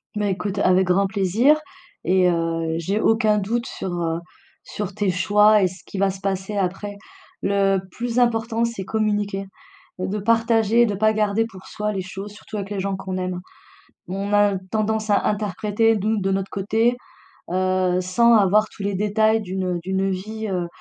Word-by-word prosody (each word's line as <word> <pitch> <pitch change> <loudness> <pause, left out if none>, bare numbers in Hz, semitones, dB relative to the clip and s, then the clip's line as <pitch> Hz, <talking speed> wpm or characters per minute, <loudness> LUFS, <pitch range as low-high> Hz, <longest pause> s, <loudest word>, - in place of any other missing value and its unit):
Bah, 210 -1 0
écoute 195 +1 -2
avec 185 0 +4
grand 195 +2 +3
plaisir 220 - +3 0.4
et 185 -1 +3
heu, 165 -1 -1
j'ai 195 +6 -1
aucun 215 -1 +3
doute 230 +4 -2
sur, 190 - -5
heu, 165 0 -1 0.4
sur 205 -2 -5
tes 200 0 0
choix 210 +3 +4
et - - +4
ce 180 0 -11
qui 195 - -8
va 195 0 +2
se 190 - -10
passer 195 +1 -3
après. 200 +1 -2 0.4
Le 195 -1 +2
plus 240 +3 -2
important 230 -1 +1
c'est 230 -5 -2
communiquer. 205 -2 -1 0.5
De 190 +3 -2
partager, 230 +1 +3
de 205 - -1
pas 215 +2 +2
garder 215 +1 +1
pour 190 -5 -12
soi 210 0 -3
les 195 - -2
choses, 195 +2 -7
surtout 210 +1 -9
avec 200 0 -5
les 200 - -2
gens 195 0 -1
qu'on 190 -1 -5
aime. 185 -1 -3 0.7
On 195 +2 -3
a 205 -1 +4
tendance 220 0 -1
à 205 - +3
interpréter, 210 +2 +1
nous, 215 +2 0
de 195 - 0
notre 195 0 -1
côté, 220 +5 +1 0.6
heu, 185 0 +1
sans 235 +6 +3
avoir 210 0 +4
tous 205 - -12
les 200 -1 -1
détails 215 +2 +2
d'une, 190 -1 -4
heu - - -2
d'une 190 +1 0
vie, 215 +4 -4
heu, 180 -2 -1
200 Hz, 180 wpm, -22 LUFS, 190-215 Hz, 0.7 s, avec